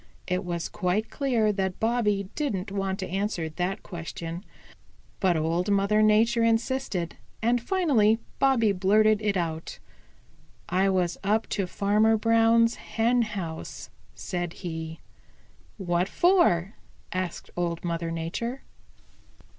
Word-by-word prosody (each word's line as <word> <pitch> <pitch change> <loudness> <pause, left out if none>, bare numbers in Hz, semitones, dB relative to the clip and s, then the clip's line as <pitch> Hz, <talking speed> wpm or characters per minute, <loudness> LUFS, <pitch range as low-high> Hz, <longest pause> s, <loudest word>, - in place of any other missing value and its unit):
It 180 +1 -1
was 170 -2 -3
quite 205 +2 -1
clear 235 -7 +1
that 190 -2 -2
Bobby 215 -4 +1
didn't 210 -10 -2
want 195 -1 -2
to 190 - -3
answer 190 -3 -2
that 180 +5 -3
question. 170 0 -6 0.8
But 180 -3 +2
Old 165 +4 0
Mother 200 +1 +3
Nature 225 +2 +4
insisted, 230 -6 0 0.2
and 240 +2 +1
finally 245 - +3 0.2
Bobby 250 -6 +4
blurted 210 +3 +3
it 205 -2 0
out. 165 -2 -3 0.9
"I 185 +3 +2
was 180 -2 0
up 215 +3 +1
to 195 -2 -1
Farmer 210 +4 +2
Brown's 230 +1 +4
hen 235 +2 +1
house," 190 -8 -5 0.2
said 175 -2 -4
he. 160 -1 -5 0.8
"What 175 -1 0
for?" 280 - +3 0.4
asked 185 -2 -4
Old 170 -1 -2
Mother 170 -1 -2
Nature. 170 +11 -4
200 Hz, 120 wpm, -27 LUFS, 175-225 Hz, 0.9 s, Nature